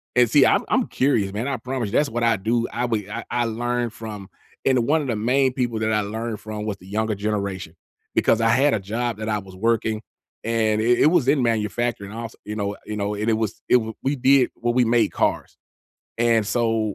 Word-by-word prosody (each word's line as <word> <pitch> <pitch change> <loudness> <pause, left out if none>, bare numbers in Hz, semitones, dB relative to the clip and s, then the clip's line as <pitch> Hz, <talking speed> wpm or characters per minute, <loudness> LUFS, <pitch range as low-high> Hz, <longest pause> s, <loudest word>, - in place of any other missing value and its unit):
and 125 -2 +5
see, 140 +3 +6
I'm - - +3
I'm - - +2
curious, 110 -8 +1
man, 115 +6 -2
I 135 - -1
promise 125 0 -3
you, - - -7
that's 145 +3 +2
what 120 +1 -2
I 115 -1 +3
do, 115 +4 0
I 120 - -1
would 110 -4 -2
I 115 +2 -5
I 120 -1 0
learned 120 +1 -2
from 105 -4 -8 0.4
and 130 -3 +3
one 155 +4 +2
of 145 - -4
the 120 - -1
main 130 +5 +2
people 120 -3 -1
that 110 0 0
I 105 - +2
learned 110 +1 -4
from 105 -1 -6
was 105 -2 -3
the 90 - -16
younger 110 +2 -1
generation 100 -4 -3 0.4
because 115 - +2
I 115 - +3
had 135 +5 +4
a 110 - +1
job 115 +3 -2
that 110 0 -4
I 105 -1 0
was 95 -1 -12
working, 110 +1 0 0.4
and 110 -2 +1
it 120 +2 +3
it - - +6
was 155 -5 +3
in 140 -1 +3
manufacturing 115 -2 -1
also, 115 0 -7
you 105 - -5
know 100 -1 -3
you 105 - -5
know, 105 0 -2
and 105 +2 -1
it - - +3
was 110 -1 -2
it - - +1
w 110 -2 +1
we 135 +2 0
did 135 0 +4
well, 120 0 -1
we 125 0 +4
made 115 -2 +3
cars, - - -1 0.6
and 115 -2 +2
so, 115 -2 0
115 Hz, 235 wpm, -23 LUFS, 105-120 Hz, 0.6 s, see